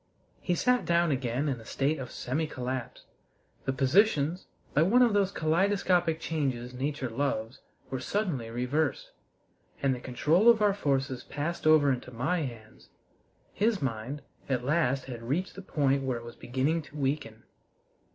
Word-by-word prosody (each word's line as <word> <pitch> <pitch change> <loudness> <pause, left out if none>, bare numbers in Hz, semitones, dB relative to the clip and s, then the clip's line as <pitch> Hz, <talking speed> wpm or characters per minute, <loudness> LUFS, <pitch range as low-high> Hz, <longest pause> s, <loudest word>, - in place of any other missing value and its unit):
He 180 - 0
sat 250 +7 +2
down 170 -1 +2
again 130 +1 -1
in 130 -5 -2
a - - -12
state 140 +6 -1
of 125 -2 -6
semi 150 +8 -2
collapse. 130 -3 -5 0.6
The - - +1
positions, 155 +4 +2 0.3
by 150 - +4
one 230 +10 +5
of 235 -3 +3
those 200 -1 +2
kaleidoscopic 175 0 +2
changes 130 -7 -2
nature 135 +1 -2
loves, 115 -1 -2 0.3
were 130 - -2
suddenly 165 - -2
reversed, 125 +6 -1 0.7
and 135 -1 +2
the 125 - -5
control 155 - +3
of 230 -2 +6
our 205 -1 +4
forces 135 -8 -1
passed 155 +3 -3
over 155 -3 +6
into 125 0 -6
my 140 +9 0
hands. 115 -6 -8 0.6
His 215 0 +1
mind 130 +3 -3 0.3
at 125 -2 0
last 140 -3 +1
had 120 -3 -7
reached 145 +11 -2
the 195 - -8
point 140 -7 +1
where 130 -2 -1
it 115 - -9
was 120 - -9
beginning 135 +7 0
to 145 0 -12
weaken. 135 -6 -2
140 Hz, 160 wpm, -29 LUFS, 125-170 Hz, 0.7 s, of